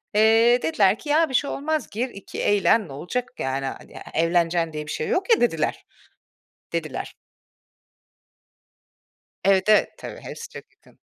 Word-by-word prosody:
Eee, 225 +3 +5
dediler 205 -9 +2
ki, 295 - -9
"Ya, 315 +1 +3
bir - - -7
şey 280 +3 +1
olmaz 310 +2 -2
gir, 240 +5 -2
iki 200 -4 -8
eğlen, 205 0 +3
ne 135 - -10
olacak 240 - -4
yani. 135 +1 -2
Hani 135 - -7
e 155 - -6
evleneceksin 165 -1 +1
diye 150 0 -5
bir - - -5
şey 155 - -3
yok 385 +6 -1
ya." - - -5
dediler, 165 -10 0 0.9
dediler. - - -4 2.3
Evet, 195 +1 +3
evet, 215 - +5
tabii, - - -8
hepsi 465 - -8
çok - - -10
yakın. - - -25
210 Hz, 155 wpm, -24 LUFS, 165-250 Hz, 2.3 s, Eee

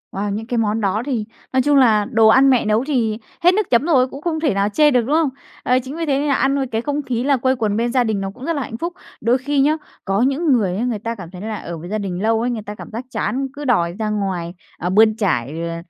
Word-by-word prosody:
Wow, 200 +1 -2
những 220 +2 -4
cái 245 - -2
món 220 0 0
đó 200 +2 0
thì 240 -7 -2 0.3
nói 260 - +4
chung 290 +1 +3
là 220 -6 +4
đồ 225 -1 +5
ăn 265 +5 +6
mẹ 255 -4 +3
nấu 215 +3 +2
thì 225 -7 0 0.3
hết 355 - +6
nước 420 +1 0
chấm 245 +5 +3
rồi, 265 -7 +3
cũng 275 +2 -10
không 320 -1 -1
thể 310 -8 +1
nào 200 +1 +1
chê 295 +8 +4
được, 250 - +3
đúng 270 +7 0
không? 320 -3 +3 0.3
Ấy, 250 +1 +3
chính 260 +3 -7
vì 330 0 -2
thế 275 -2 +1
nên 295 - -1
nà 280 - +2
ăn 275 +1 +2
rồi 270 -2 -1
cái 225 -1 -2
không 290 +3 -2
khí 250 -3 -2
là 275 -1 +2
quây 260 +2 +1
quần 215 -3 -1
bên 235 +1 0
gia 255 -1 +3
đình 215 -4 -1
nó 195 - -3
cũng 255 +4 -10
rất 335 - 0
là 285 - -2
hạnh 225 -2 -6
phúc. 340 +7 -4 0.3
Đôi 240 +4 +3
khi 280 +2 -1
nhá, 305 +3 +3 0.3
có 195 +2 +1
những 275 +5 +1
người 195 -7 +1
á 225 - -1
người 240 -4 -1
ta 230 +2 -4
cảm 175 -5 -10
thấy 180 0 -9
là 220 0 -4
ở 170 -3 -7
với 170 +3 -9
gia 215 - -1
đình 190 -3 -4
lâu 225 +1 +2
ấy, 245 - 0
người 230 -3 -3
ta 210 0 -8
cảm - - -11
giác 235 +4 -5
chán, 260 +4 -1
cứ 290 +1 -7
đòi 175 -10 +2
ra 215 - -1
ngoài, 190 -5 -2 0.2
ờ, 180 - -3
bươn 215 +3 +5
trải, 165 - -1
ờ, 165 - -4
235 Hz, 300 wpm, -20 LUFS, 210-270 Hz, 0.3 s, ăn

